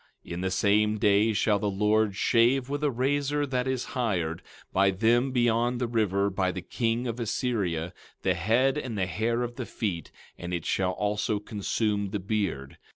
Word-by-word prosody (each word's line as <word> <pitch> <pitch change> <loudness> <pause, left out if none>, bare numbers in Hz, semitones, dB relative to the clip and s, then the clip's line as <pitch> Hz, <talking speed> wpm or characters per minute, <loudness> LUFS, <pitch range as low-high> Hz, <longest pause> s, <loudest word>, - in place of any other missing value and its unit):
17:20 - - -7
In 85 - -4
the 95 - 0
same 105 +2 +2
day 105 +1 +3
shall 105 -1 +2
the 105 - 0
Lord 105 +1 +2
shave 125 +5 +3
with 145 +1 -3
a 150 - +3
razor 145 +3 0
that 130 -2 -1
is 130 -2 -1
hired, 90 -10 -1 0.3
by 95 +1 +4
them 115 +7 +2
beyond 120 0 +1
the 125 - 0
river, 100 -4 +1
by 95 -1 0
the 90 -1 -6
king 115 +5 -1
of 120 0 -3
Assyria, 100 -8 -1 0.3
the 95 - +3
head, 115 - +2
and 120 -6 -5
the 95 - +1
hair 115 +5 -1
of 120 0 -5
the 125 - -3
feet; 90 -8 -3 0.3
and 90 0 -3
it 85 - -5
shall 95 -1 0
also 105 +1 -1
consume 105 0 -1
the 105 +1 -3
beard. 95 -9 -3
110 Hz, 185 wpm, -27 LUFS, 95-120 Hz, 0.3 s, by